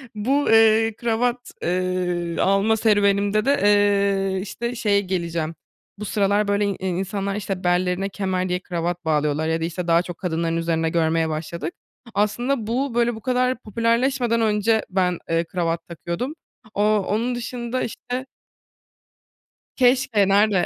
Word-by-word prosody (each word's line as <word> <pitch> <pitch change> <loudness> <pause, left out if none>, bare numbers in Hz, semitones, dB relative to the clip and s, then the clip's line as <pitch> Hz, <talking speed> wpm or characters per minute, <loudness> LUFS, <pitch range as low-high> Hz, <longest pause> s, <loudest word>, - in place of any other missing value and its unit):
Bu, 270 +7 +1
eee, 225 0 +5
kravat, 240 +2 -1
eee, 180 -1 -1
alma 195 +3 +3
serüvenimde 205 -1 +2
de, 280 +1 +3
eee, 200 -2 +3
işte, 235 +5 -4
şeye 205 -3 +2
geleceğim. 170 -4 -3 0.4
Bu 210 - -6
sıralar, 205 0 +1
böyle, 205 0 +1
in 200 -2 -2
insanlar, 195 +2 -2
işte, 195 -2 -4
bellerine 180 +2 +1
kemer 190 -2 -2
diye 180 0 0
kravat 175 -1 -3
bağlıyorlar 150 0 +1
ya 160 0 0
da, - - 0
işte, 175 +1 -4
daha 170 0 +4
çok 175 -1 -8
kadınların 165 -2 -1
üzerinde 165 -1 0
görmeye 160 -1 +1
başladık. 155 +1 -4 0.4
Aslında 230 +3 0
bu, 250 +2 -1
böyle, 240 -1 +2
bu 220 - -10
kadar 255 0 0
popülerleşmeden 230 +2 +1
önce 220 0 +2
ben, 180 -2 0
eee, 165 0 +2
kravat 165 -1 -2
takıyordum. 170 - -4 0.4
Ooo, 210 +1 +3
onun 235 +4 0
dışında, 240 +1 -4
işte 250 +3 -5 1.5
Keşke 245 -5 +3
nerde? 200 -1 +3
200 Hz, 140 wpm, -22 LUFS, 175-225 Hz, 1.5 s, eee